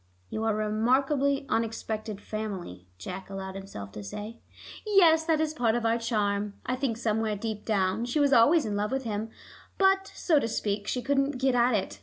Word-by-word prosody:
"You 220 - -2
are 215 -1 +1
a 215 - 0
remarkably 270 +5 +2
unexpected 220 -2 -2
family," 190 - -6
Jack 185 - -7
allowed 190 -1 -6
himself 190 - -8
to 105 0 -8
say. 210 - -7 0.4
"Yes; 340 -7 +5
that 320 -2 +2
is 310 -1 0
part 240 -6 +1
of 240 -1 -1
our 230 +1 +2
charm. 205 -3 -1
I 255 - 0
think 255 -4 -1
somewhere 220 -2 0
deep 210 0 -5
down 200 +1 +1
she 245 +5 -1
was 285 -1 +4
always 285 +7 +5
in 210 -2 -2
love 210 +2 -1
with 265 0 -1
him, 220 -1 -3 0.5
but, 385 0 +3
so 315 -5 +3
to 225 - -1
speak, 205 -2 -2
she 250 - -2
couldn't 275 +1 +1
get 265 0 +2
at 245 -1 +3
it. 195 - -3
225 Hz, 195 wpm, -28 LUFS, 205-270 Hz, 0.5 s, Yes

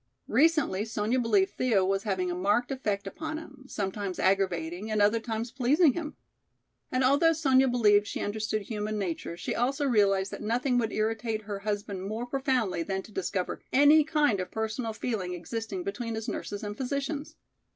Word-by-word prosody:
Recently 285 - +3
Sonya 220 +2 0
believed 210 -5 +2
Thea 220 -7 +3
was 195 +1 +1
having 190 -4 -1
a - - -1
marked 205 +8 +1
effect 210 -7 -2
upon 310 +10 -5
him, 275 -4 -11
sometimes 195 -4 -3
aggravating 190 0 0
and 215 -1 0
at 205 - +6
other 220 +3 +2
times 225 0 -4
pleasing 275 +4 +4
him. 310 -3 -5 0.8
And 255 +1 +1
although 285 +6 +4
Sonya 270 -4 +4
believed 210 -4 +4
she - - -4
understood 215 0 -2
human 215 0 -3
nature, 170 -3 -3
she 180 - -3
also 270 +4 0
realized 200 -6 +2
that - - -7
nothing 245 +3 +1
would 225 -2 -1
irritate 220 0 -1
her 200 -1 -5
husband 205 -1 -3
more 215 +5 -4
profoundly 255 -8 0
than 190 +2 -2
to - - -14
discover 190 -2 -3
any 290 +3 +6
kind 295 -9 +2
of 185 - -3
personal 220 +1 -3
feeling 205 -5 -3
existing 195 +1 -5
between 230 +4 -4
his 220 +1 -5
nurses 205 -1 -4
and 205 0 -4
physicians. 280 +4 -3
220 Hz, 175 wpm, -28 LUFS, 200-255 Hz, 0.8 s, at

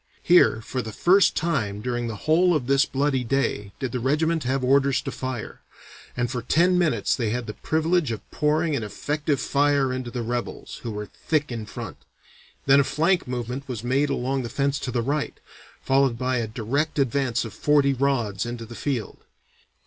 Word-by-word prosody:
Here, 175 -10 +5
for 125 +3 -3
the 110 - -6
first 185 - +4
time 120 -12 -1
during 120 +1 -2
the 110 - -4
whole 170 +3 +4
of 140 -5 -1
this 140 +2 +3
bloody 135 -2 0
day, 115 -5 -1
did 130 -3 -3
the 125 - -2
regiment 155 +4 +1
have 130 +1 0
orders 135 +1 +3
to - - -4
fire, 130 -4 -5 0.6
and 120 -1 0
for 125 -3 -2
ten 170 +9 +3
minutes 155 - +2
they 115 -4 -1
had 120 +2 -2
the 105 - -6
privilege 160 0 0
of 110 -3 -6
pouring 155 +1 +1
an 130 - -1
effective 145 +6 -2
fire 140 -2 +2
into 130 -1 -4
the 120 0 -4
rebels, 120 +1 -4
who 120 - -5
were 105 -1 -4
thick 150 +6 -2
in 110 -3 -5
front. - - -7 0.7
Then 140 +1 +6
a - - +5
flank 170 +5 +1
movement 125 +2 -4
was 120 -4 -5
made 135 +4 +1
along 135 0 -1
the 120 - -5
fence 140 +1 0
to 130 - -4
the 120 -2 0
right, 145 +4 -2 0.4
followed 135 -3 +2
by 130 +1 0
a 115 -2 -1
direct 125 +9 -2
advance 130 -3 +1
of 110 - -8
forty 145 +2 +3
rods 120 -7 0
into 120 -1 -5
the 115 - -10
field. 120 -2 -3
130 Hz, 190 wpm, -24 LUFS, 120-145 Hz, 0.7 s, Then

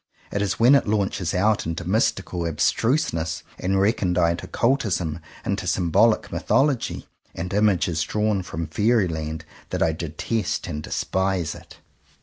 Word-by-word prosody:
It 100 - -1
is 100 +1 -1
when 120 +4 +6
it 140 - +4
launches 100 -5 0
out 105 0 +2
into 85 +1 -4
mystical 95 -4 0
ab 80 - -4
struseness, 85 - +1 0.2
and 95 +1 +1
recondite 90 -4 +1
occultism, 100 - 0 0.3
into - - -2
symbolic 95 +6 +2
mythology 135 -3 +1 0.3
and 90 +3 -4
images 95 -6 +2
drawn 105 +1 0
from 85 -2 -5
fairy 110 +2 +2
land, 80 -1 -4 0.2
that - - 0
I 80 - +2
detest 85 +6 -2
and 75 - -4
despise 95 -1 -1
it. - - -14
95 Hz, 135 wpm, -24 LUFS, 85-110 Hz, 0.3 s, when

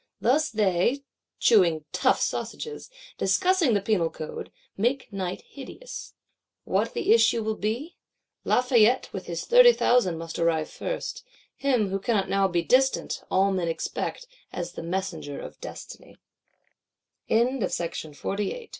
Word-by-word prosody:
Thus 290 +7 +2
they, 210 +5 +1 0.4
chewing 170 -9 +4
tough - - +2
sausages, 455 +1 -4 0.3
discussing 365 - +3
the 200 - +1
Penal 190 -6 +1
Code, 155 -1 -7 0.2
make 240 +2 -1
night 185 -2 -3
hideous. 385 - -10 0.5
What 210 +5 -1
the - - +3
issue 225 0 +4
will 220 0 -1
be? 235 +11 -3 0.5
Lafayette 250 -1 +3
with - - -6
his - - -4
thirty - - +8
thousand 235 - +2
must 165 0 -6
arrive 165 -2 +1
first: - - -5 0.3
him, 250 -7 +1
who 195 +1 -2
cannot 200 -1 0
now 195 0 +3
be 175 -2 0
distant, 265 +8 +2
all 195 +1 +3
men 185 -3 -1
expect, 165 - -3 0.3
as 175 -1 -4
the - - -7
messenger 165 -4 -4
of - - -10
Destiny. - - -10 1.1
Chapter 230 +2 +4
1.7.IX. 170 - -3
Lafayette. 210 - -3
210 Hz, 135 wpm, -26 LUFS, 180-255 Hz, 1.1 s, thirty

